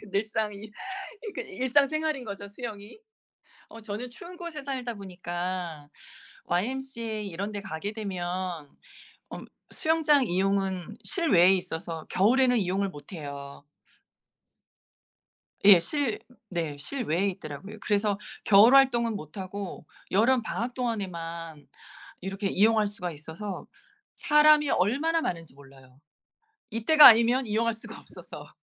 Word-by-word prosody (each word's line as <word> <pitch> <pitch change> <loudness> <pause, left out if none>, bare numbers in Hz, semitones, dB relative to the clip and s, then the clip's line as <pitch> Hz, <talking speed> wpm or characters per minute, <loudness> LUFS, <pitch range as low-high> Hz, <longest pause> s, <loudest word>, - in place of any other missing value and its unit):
그 205 - -14
늘상 210 +1 -1
이 210 +2 -10 0.6
그러니까 - - -4
일상 260 +4 +3
생활인 310 -3 -2
거죠 200 -1 -7
수영이. 210 - -9 0.7
어 225 - -12
저는 220 +3 -6
추운 345 +8 -11
곳에 335 -4 -7
살다 255 -4 -4
보니까 175 -4 -5 0.6
YMCA 230 +1 -3
이런 195 +4 -4
데 205 - -4
가게 195 +2 -5
되면 180 -6 -4 0.6
음 - - -8 0.2
수영장 305 -4 +3
이용은 195 +1 -1
실외에 195 - +4
있어서 165 -2 -4
겨울에는 245 +6 +4
이용을 195 0 0
못 145 -1 -12
해요. 140 -3 -8 2.0
예. 200 -3 +10
실 275 - -1 0.3
네 165 -5 -3
실외에 200 - -1
있더라고요. 185 +6 -9
그래서 205 -1 +1 0.3
겨울 220 +6 +7
활동은 235 -5 +3
못 155 +3 -9
하고 190 -3 -6 0.3
여름방학 235 +2 +1
동안에만 170 - -5 0.5
이렇게 195 +2 -4
이용할 215 +1 +3
수가 180 -4 -5
있어서 160 +6 -7 0.5
사람이 300 -1 +5
얼마나 285 - +1
많은지 165 - -4
몰라요. 135 -1 -18 0.7
이때가 295 +8 +8
아니면 235 +2 +5
이용할 225 +2 +1
수가 220 - -11
없어서. - - -12
205 Hz, 275 characters per minute, -27 LUFS, 180-245 Hz, 2.0 s, 예